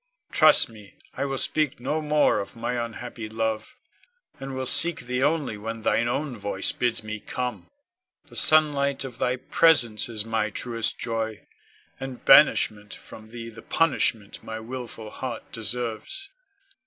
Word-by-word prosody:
Trust 155 -1 +7
me, 105 -3 -15 0.2
I 140 - -2
will 135 -1 -2
speak 155 -1 0
no 150 +6 -2
more 150 -6 +2
of 100 - -6
my 120 +1 -2
unhappy 115 -1 -7
love, 110 0 -3 0.6
and 135 0 -6
will 130 0 -3
seek 170 +6 +4
thee 125 +1 -3
only 145 -7 0
when 110 +1 -6
thine 120 +2 +2
own 140 +2 -2
voice 100 -2 -1
bids 120 -2 -1
me 110 0 -5
come. 125 +3 -5 0.6
The - - -16
sunlight 145 -3 +3
of 125 -3 -8
thy 125 - +1
presence 125 -5 +3
is 110 -2 -3
my 110 -1 -1
truest 115 +2 -2
joy, 110 -3 -4 0.5
and 135 -2 -7
banishment 105 -1 +5
from 110 0 -13
thee 115 0 -8
the 115 - -12
punishment 115 -10 0
my 110 0 -6
wilful 115 -2 -7
heart 125 -3 -6
deserves. 115 - -4
120 Hz, 150 wpm, -25 LUFS, 110-135 Hz, 0.6 s, Trust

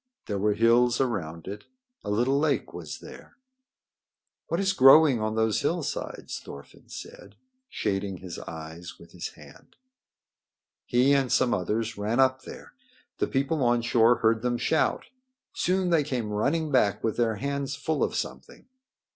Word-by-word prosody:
There 100 -2 -3
were 105 +1 +1
hills 120 +2 +3
around 90 -11 -2
it. 100 +2 -7 0.4
A 105 - -5
little 120 +7 +2
lake 145 -6 0
was 80 -4 -8
there. - - -13 1.1
"What 170 - -1
is 195 -1 +1
growing 135 - +7
on 110 0 -1
those 110 -2 +1
hillsides?" 160 -4 -3
Thorfinn - - -13
said, - - -10 0.3
shading 95 -2 -2
his 90 -1 -8
eyes 80 +2 -9
with - - -16
his - - -5
hand. - - -17 1.1
He 130 +3 +3
and 135 -3 +1
some 120 - +3
others 110 +3 -2
ran 110 +4 -1
up 130 0 +3
there. - - -11 0.5
The - - +1
people 140 +3 -1
on 120 -1 +2
shore 120 0 +4
heard 110 -1 +1
them 120 0 0
shout. 155 +6 0 0.5
Soon 185 0 0
they 165 -2 +4
came 120 -6 -3
running 150 +9 0
back 115 -7 +2
with 110 - -1
their 115 -2 +1
hands 140 +4 -3
full 150 +2 -1
of - - -1
something. - - -6
120 Hz, 155 wpm, -27 LUFS, 105-140 Hz, 1.1 s, growing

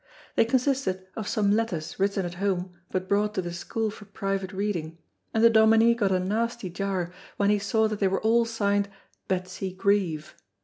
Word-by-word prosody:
They - - +5
consisted 255 -6 0
of 215 -2 -4
some 205 -2 +2
letters 190 -8 -1
written 195 -1 +1
at 175 - -4
home 185 -2 -1 0.2
but 185 0 -2
brought 210 +1 +1
to - - +1
the 175 0 -5
school 220 +4 -2
for 210 0 -12
private 195 -1 -3
reading, 185 -5 -3 0.3
and 220 - +1
the 230 - +9
Dominie 225 +1 +6
got 205 -5 +1
a 185 - +3
nasty 215 +1 -1
jar 180 -1 -2 0.2
when 200 0 +3
he 210 - +3
saw 220 +2 +2
that 215 -1 -4
they 195 - +3
were 190 0 0
all 230 +1 +4
signed 205 -3 0 0.4
"Betsy 185 0 -2
Grieve." 185 -5 0
200 Hz, 185 wpm, -27 LUFS, 185-220 Hz, 0.4 s, the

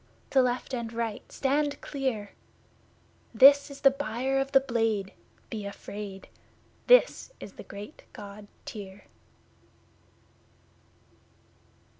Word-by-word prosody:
To 265 - +5
left 250 +1 -1
and 235 -2 -3
right 230 -2 -4
stand 285 +1 0
clear! 255 -8 -3 1.0
This 280 +5 +8
is 280 0 -10
the 275 - +7
Buyer 265 0 -1
of 270 0 -1
the 270 - +7
Blade 225 -6 -1 0.4
be 215 -2 -4
afraid! 200 -1 -7 0.6
This - - +5
is - - -9
the - - -10
great 200 +1 -10
God 205 0 -10 0.2
Tyr! 200 -2 -8
235 Hz, 105 wpm, -28 LUFS, 205-270 Hz, 1.0 s, This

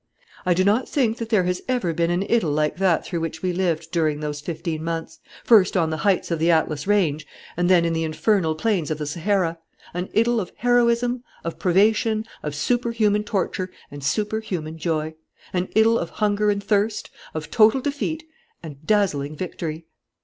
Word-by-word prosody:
"I 180 - +4
do 185 - +3
not 210 +6 +2
think 240 -5 +1
that 230 -1 -4
there 210 -5 +3
has 180 0 -1
ever 245 -10 0
been 170 +1 0
an 175 +2 +1
idyl 210 -6 +1
like 150 +2 0
that 185 -3 +2
through 170 - -3
which 165 0 -5
we 180 -1 0
lived 170 -3 -1
during 155 -4 +1
those 150 -1 -4
fifteen 160 0 -4
months, 165 0 -4 0.2
first 205 -5 +5
on 165 -2 +1
the 160 - -2
heights 185 +1 +1
of 165 - 0
the 165 +2 +2
Atlas 160 -1 +1
range 160 -8 +1 0.3
and 175 +1 +1
then 175 -2 +5
in 165 - 0
the 165 0 0
infernal 160 +1 +1
plains 180 -2 0
of 155 - -1
the 150 - -4
Sahara: 170 +2 0 0.3
an 180 +2 -3
idyl 230 +1 +3
of 180 - -8
heroism, 245 0 +2 0.2
of 165 - -5
privation, 215 +4 +2 0.2
of 150 -1 -4
superhuman 225 +1 +1
torture 185 -2 -2 0.2
and 145 -1 -9
superhuman 180 -3 -2
joy; 160 -1 -1 0.4
an 180 0 -1
idyl 225 +1 +5
of 170 - -4
hunger 210 0 +1
and 200 -1 0
thirst, 210 +1 0 0.2
of 155 -1 -5
total 220 +3 +5
defeat 290 +4 -3 0.4
and 145 -2 -10
dazzling 155 -9 +1
victory.... 165 -1 -5
180 Hz, 185 wpm, -23 LUFS, 160-215 Hz, 0.4 s, first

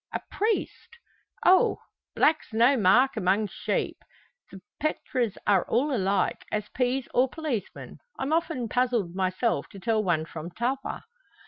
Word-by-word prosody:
"A - - -2
priest!" 445 +2 -2 0.5
"Oh! 370 +1 +5 0.4
black's 310 -6 +2
no 240 +5 +5
mark 250 +5 +4
among 200 +1 +1
sheep. - - -2 0.5
The 195 - -10 0.2
pretres 255 -7 -1
are 200 -3 +4
all 275 +4 +1
alike, 195 -2 0
as 210 -1 -2
peas 255 +1 -1
or 255 +1 +3
policemen. 270 - -5 0.2
I'm 275 +4 -1
often 320 -7 0
puzzled 240 -7 0
myself 190 +5 -1
to 195 - -11
tell 220 +1 +1
one 165 -4 +1
from 165 0 -7
t'other." 245 +9 -3
235 Hz, 135 wpm, -27 LUFS, 195-270 Hz, 0.5 s, Oh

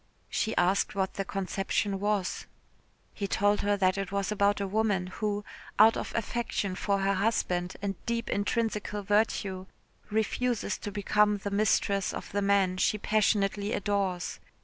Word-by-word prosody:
She 220 - -1
asked 185 +3 +2
what 190 -1 0
the 195 - -2
conception 195 +1 -1
was. 205 -2 -1 0.7
He 200 - -3
told 205 +1 +2
her 205 0 +1
that 190 0 +2
it 195 -1 -3
was 200 0 -1
about 205 0 +2
a 200 - -1
woman 205 -2 +1
who, 205 +2 -3 0.3
out 220 +2 +7
of - - -4
affection 230 -4 -2
for 200 +1 0
her 195 +1 +2
husband, 185 -3 0
and 195 -2 -3
deep 235 0 -1
intrinsical 210 -1 -1
virtue, 195 -2 0 0.4
refuses 220 +2 -1
to 205 - -5
become 210 +1 +2
the 200 0 -5
mistress 200 -1 +1
of - - -7
the 205 - 0
man 195 -2 +2
she 215 - +2
passionately 205 -1 +1
adores. 195 -3 -1
200 Hz, 150 wpm, -29 LUFS, 195-210 Hz, 0.7 s, out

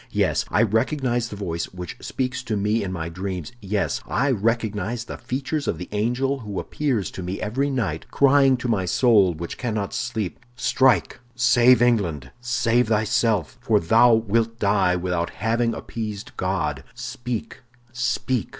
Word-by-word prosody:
"Yes, - - +1
I 110 - +3
recognize 120 +2 0
the - - -7
voice 85 -5 -3
which 90 -2 -8
speaks 130 0 -3
to 110 -3 -1
me 105 +2 +1
in 95 - -3
my 80 -3 -4
dreams; 90 -1 -5
yes, 100 0 -1
I 140 +1 +1
recognize 110 0 -1
the 115 - -7
features 140 +3 -3
of - - 0
the 90 - -7
angel 125 +6 0
who 105 -5 -5
appears 130 -10 -1
to - - -7
me 90 +2 -4
every 135 +7 -1
night, 105 - -2
crying 135 -1 +4
to 125 - -4
my 105 -6 +1
soul, 100 -3 +4
which 85 +2 -6
cannot 110 -5 -2
sleep: 120 -7 -3 0.2
'Strike, 125 0 +2 0.2
save 120 0 +5
England, 100 - +1
save 120 -1 +1
thyself—for 110 -4 +1
thou 115 +7 +5
wilt 115 +1 0
die 100 -4 +2
without 90 -1 -1
having 115 +2 0
appeased 110 +1 -6
God!' 75 -7 -1
Speak, 120 -1 -5 0.3
speak!" 125 0 -1
115 Hz, 150 wpm, -23 LUFS, 95-125 Hz, 0.3 s, save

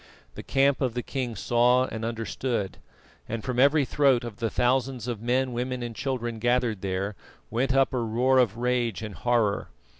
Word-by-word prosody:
The - - -7
camp 140 0 +2
of 125 -3 0
the 125 - -2
king 125 -4 -3
saw 125 +4 +3
and 110 -3 -6
understood, 115 -2 -3 0.5
and 115 -1 -3
from 125 -1 -2
every 140 +2 +5
throat 135 -3 +3
of 115 -4 -7
the 115 -1 -1
thousands 125 -1 0
of 115 -4 -3
men, 125 +2 0
women 125 +1 -3
and 120 -1 -5
children 120 -3 -3
gathered 120 -3 +1
there, 95 +1 -2 0.4
went 130 +4 +1
up 135 0 +3
a 125 - 0
roar 120 +3 +2
of 115 -3 +2
rage 120 -3 0
and 105 -2 -6
horror. 115 -3 +1
120 Hz, 180 wpm, -26 LUFS, 115-130 Hz, 0.5 s, every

